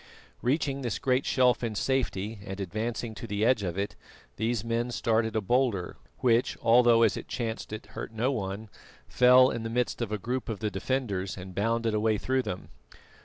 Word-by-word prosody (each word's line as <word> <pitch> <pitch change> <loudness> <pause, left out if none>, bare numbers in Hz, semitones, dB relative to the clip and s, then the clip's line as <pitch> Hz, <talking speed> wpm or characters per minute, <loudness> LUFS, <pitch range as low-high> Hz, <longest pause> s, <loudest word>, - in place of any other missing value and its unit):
Reaching 140 +1 0
this 120 -5 -2
great 130 0 +1
shelf 125 -1 +3
in 115 -2 -2
safety 105 -3 -1
and 95 0 -6
advancing 110 +4 -3
to 115 - -8
the 105 +1 0
edge 125 -3 +3
of 90 -2 -3
it, 100 +1 -2 0.4
these 110 0 0
men 115 +1 -1
started 110 -2 0
a 110 - +2
boulder, 115 -4 0 0.3
which, 120 -1 +2
although 120 0 +5
as 110 - +3
it - - -7
chanced 115 -3 -4
it 110 -1 -6
hurt 110 +1 -7
no 115 +4 0
one, 100 -2 -4 0.4
fell 125 +1 +6
in 115 - -3
the 115 - -4
midst 125 +1 -1
of 115 -3 -2
a 105 - 0
group 125 +5 -3
of 110 -3 -3
the 105 0 -2
defenders 100 -3 -2
and 95 0 -8
bounded 115 +3 0
away 110 0 +2
through 130 +4 0
them. 105 -6 -6
115 Hz, 190 wpm, -28 LUFS, 105-125 Hz, 0.4 s, fell